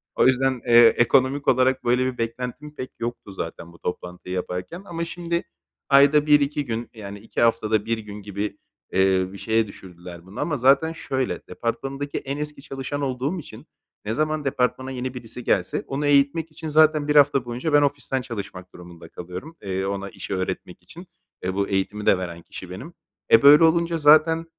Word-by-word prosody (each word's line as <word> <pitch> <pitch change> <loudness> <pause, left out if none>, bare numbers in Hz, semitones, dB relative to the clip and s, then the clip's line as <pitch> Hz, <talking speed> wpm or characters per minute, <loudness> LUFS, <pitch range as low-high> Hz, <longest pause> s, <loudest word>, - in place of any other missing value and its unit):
O - - +4
yüzden, 130 -1 +2
eee, 120 0 +8
ekonomik 130 +3 +2
olarak 130 +1 +3
böyle 125 +1 +2
bir - - -19
beklentim 125 +6 -5
pek 130 -2 -6
yoktu 120 -3 -5
zaten 85 -1 -7
bu 85 - -18
toplantıyı 90 +1 -5
yaparken 90 - -5
ama 170 -2 -4
şimdi 170 0 -3 0.5
ayda 140 +2 +6
1-2, 140 -5 +1
yani, 100 -3 -8
2 110 - -4
haftada 110 -2 +2
1 115 0 0
gün 105 -1 -9
gibi, 100 +1 -4 0.4
eee, 95 -1 +3
bir - - -8
şeye 110 +1 +1
düşürdüler 90 -3 -12
bunu 95 +6 -10
ama 150 -3 -1
zaten 135 +5 +4
şöyle, 130 -5 -3
departmanımdaki 135 +4 -4
en 140 +1 -4
eski 150 -1 -6
çalışan 135 0 -5
olduğum 135 +6 -2
için 155 - -12 0.4
ne 110 - -1
zaman 155 +2 -1
departmana 130 0 -1
yeni 130 0 -4
birisi 125 -1 -8
gelse - - 0
onu 140 +2 -2
eğitmek 145 +3 +2
için 155 +1 -7
zaten 155 -1 +4
1 150 - +1
hafta 140 -3 +5
boyunca 125 +6 -3
ben 145 - +6
ofisten 140 -2 -1
çalışmak 100 -7 -8
durumunda 85 -2 -12
kalıyorum, 90 - -9
eee, 95 -1 -3
ona 100 0 -3
işi 100 - -6
öğretmek 95 0 -4
için - - -13 0.4
ve 90 +1 -1
bu 100 0 0
eğitimi 100 +2 -2
de - - +5
veren 85 -2 -6
kişi 90 +2 -10
benim. 95 - -9 0.4
E, 115 - +8
böyle 145 +3 +9
olunca 170 +1 +3
zaten 160 +2 +5
125 Hz, 175 wpm, -23 LUFS, 100-145 Hz, 0.5 s, böyle